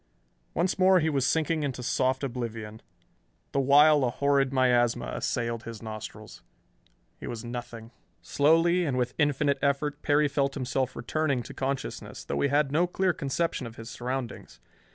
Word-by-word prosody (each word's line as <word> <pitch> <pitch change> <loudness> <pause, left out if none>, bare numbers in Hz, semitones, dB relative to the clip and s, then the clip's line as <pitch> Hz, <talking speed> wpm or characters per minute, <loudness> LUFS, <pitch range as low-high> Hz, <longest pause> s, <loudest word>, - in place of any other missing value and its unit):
Once 180 +3 0
more 185 0 +6
he 160 -1 +1
was 135 -3 +1
sinking 160 0 +1
into 130 -4 -3
soft 130 +2 0
oblivion, 115 -4 -5 0.7
the 140 - 0
while 145 +2 +6
a 125 - +2
horrid 140 +1 +1
miasma 125 -3 +2
assailed 115 -1 -2
his 115 -1 -8
nostrils. 110 -1 -8 0.8
He - - -7
was 120 0 -6
nothing.... 120 -1 -7 0.3
Slowly, 165 +5 +3
and 140 -6 -1
with 125 -1 -1
infinite 145 -1 +2
effort, 145 +1 0
Perry 150 0 +3
felt 140 -1 -1
himself 130 -1 -2
returning 140 -1 -1
to - - -10
consciousness, 135 0 -4
though - - -2
he 140 - +2
had 145 0 +2
no 170 +5 +2
clear 185 0 +1
conception 140 -2 -2
of 115 - -11
his 115 0 -9
surroundings. 125 -1 -5
135 Hz, 155 wpm, -27 LUFS, 120-150 Hz, 0.8 s, more